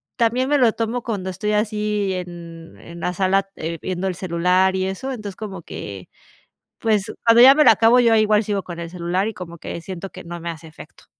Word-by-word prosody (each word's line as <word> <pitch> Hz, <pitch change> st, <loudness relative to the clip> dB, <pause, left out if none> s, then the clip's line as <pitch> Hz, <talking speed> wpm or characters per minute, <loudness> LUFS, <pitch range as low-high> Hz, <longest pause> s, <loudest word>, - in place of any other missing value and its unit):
también 240 Hz, +3 st, +1 dB
me 290 Hz, +1 st, +3 dB
lo 245 Hz, -4 st, +4 dB
tomo 230 Hz, +2 st, -2 dB
cuando 200 Hz, -5 st, -3 dB
estoy 210 Hz, +3 st, -3 dB
así 210 Hz, -2 st, 0 dB
en 170 Hz, -2 st, -8 dB
en 170 Hz, 0 st, -11 dB
la 180 Hz, -, -1 dB
sala, 195 Hz, +1 st, +1 dB
eh, 165 Hz, +1 st, -4 dB
viendo 185 Hz, +1 st, -3 dB
el 185 Hz, -, -2 dB
celular 180 Hz, +2 st, +1 dB
y 185 Hz, -, 0 dB
eso 195 Hz, +8 st, -4 dB
entonces 210 Hz, -6 st, -6 dB
como 195 Hz, -5 st, -7 dB
que 100 Hz, -9 st, -8 dB, 0.7 s
pues 215 Hz, -3 st, 0 dB
cuando 230 Hz, 0 st, +7 dB
ya 265 Hz, +2 st, +9 dB
me 300 Hz, 0 st, +4 dB
lo -, -, +9 dB
acabo 225 Hz, +3 st, +5 dB
yo 230 Hz, -2 st, +4 dB
igual 215 Hz, 0 st, +3 dB
sigo 200 Hz, -2 st, -2 dB
con 175 Hz, -1 st, -8 dB
el 170 Hz, 0 st, -6 dB
celular 180 Hz, +3 st, -1 dB
y 220 Hz, -, -4 dB
como 175 Hz, -4 st, -9 dB
que 170 Hz, -, -7 dB
siento 185 Hz, +2 st, -7 dB
que 185 Hz, -, -10 dB
no 175 Hz, 0 st, -7 dB
me 170 Hz, +1 st, -5 dB
hace 165 Hz, 0 st, -8 dB
efecto. 160 Hz, -, -15 dB
190 Hz, 220 wpm, -21 LUFS, 175-220 Hz, 0.7 s, ya